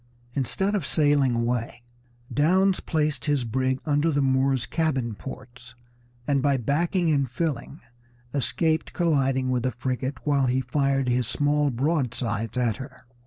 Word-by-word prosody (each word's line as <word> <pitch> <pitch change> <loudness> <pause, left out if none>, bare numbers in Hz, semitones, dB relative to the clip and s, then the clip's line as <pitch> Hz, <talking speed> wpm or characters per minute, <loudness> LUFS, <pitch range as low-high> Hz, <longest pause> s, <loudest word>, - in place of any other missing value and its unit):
Instead 190 - -1
of 200 -5 0
sailing 145 -4 +2
away 120 0 -2 0.5
Downes 185 +6 +3
placed 150 -5 -1
his 145 -4 +1
brig 130 +3 0
under 150 +1 +2
the 145 -2 +1
Moor's 135 -1 +2
cabin 135 -8 -1
ports, 125 0 -10 0.5
and 140 0 +1
by 140 -1 +2
backing 165 - +1
and 140 -3 +1
filling 145 +1 -3 0.5
escaped 145 +4 0
colliding 135 -6 +1
with 125 -1 +1
the 130 - 0
frigate 130 +2 -4
while 140 -3 +2
he 125 +1 +1
fired 135 +1 0
his 125 -1 +1
small 145 +2 +1
broadsides 125 -5 -1
at 120 -3 +1
her. 130 -1 -10
135 Hz, 140 wpm, -25 LUFS, 125-150 Hz, 0.5 s, Downes